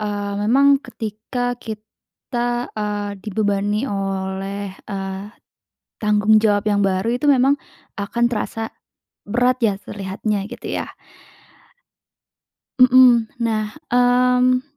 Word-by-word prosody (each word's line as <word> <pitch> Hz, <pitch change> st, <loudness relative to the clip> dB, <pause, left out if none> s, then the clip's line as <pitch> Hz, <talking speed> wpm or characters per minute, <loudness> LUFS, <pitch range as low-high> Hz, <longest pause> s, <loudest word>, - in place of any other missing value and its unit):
Eee, 205 Hz, -1 st, -3 dB
memang 275 Hz, +5 st, +4 dB
ketika 230 Hz, +3 st, -4 dB
kita, 240 Hz, +2 st, -5 dB
eee, 205 Hz, -1 st, -3 dB
dibebani 205 Hz, +2 st, 0 dB
oleh, 195 Hz, 0 st, -3 dB, 0.2 s
eee, 195 Hz, -1 st, -4 dB, 0.8 s
tanggung 210 Hz, 0 st, +4 dB
jawab 205 Hz, -2 st, +2 dB
yang 205 Hz, -1 st, +2 dB
baru 190 Hz, +2 st, 0 dB
itu 280 Hz, -, -2 dB
memang, 270 Hz, 0 st, +5 dB, 0.5 s
akan 235 Hz, +4 st, -1 dB
terasa 225 Hz, 0 st, -3 dB, 0.6 s
berat 250 Hz, +3 st, +2 dB
ya 205 Hz, -3 st, +3 dB
terlihatnya 200 Hz, +1 st, -3 dB
gitu 245 Hz, -, -8 dB
ya? -, -, -4 dB, 1.9 s
Mmm. 250 Hz, -2 st, +7 dB, 0.2 s
Nah, 215 Hz, -2 st, -1 dB, 0.2 s
mmm, 250 Hz, +1 st, +3 dB
215 Hz, 100 wpm, -20 LUFS, 205-245 Hz, 1.9 s, Mmm